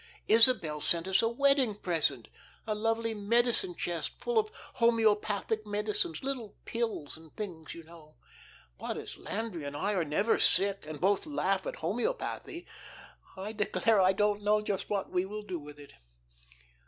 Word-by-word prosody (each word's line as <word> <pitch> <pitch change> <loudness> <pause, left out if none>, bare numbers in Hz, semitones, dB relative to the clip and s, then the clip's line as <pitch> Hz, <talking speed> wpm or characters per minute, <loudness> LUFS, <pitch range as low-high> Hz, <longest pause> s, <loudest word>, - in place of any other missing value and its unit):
Isabel 220 -10 +4
sent 170 +3 +1
us 190 0 +3
a 225 - +2
wedding 270 -2 +3
present 155 - 0 0.4
a 215 - 0
lovely 225 +1 0
medicine 240 - +2
chest - - -3
full 485 -2 +2
of 430 0 0 0.3
homoeopathic 220 -2 +2
medicines, 205 -5 -1
little 260 -6 -4
pills 225 -11 -2
and 160 -1 -16
things, 175 -7 -6
you 170 - -9
know. 160 -2 -15 0.6
But, - - -3
as - - -7
Landry 205 -7 -4
and 145 0 -5
I 200 +7 0
are 180 -4 +1
never 200 +9 +1
sick 195 -4 +2
and 155 -1 -6
both 200 - +2
laugh 195 -10 0
at - - -3
homoeopathy, 245 - -3 0.7
I 195 +3 -4
declare 215 0 +2
I 185 0 +6
don't 210 +1 +1
know 210 +1 +3
just 205 -2 -3
what 200 -2 -1
we 180 0 +2
will 210 +2 -6
do 185 -4 -4
with 150 0 -11
it. 145 -1 -13
205 Hz, 160 wpm, -31 LUFS, 175-225 Hz, 0.7 s, I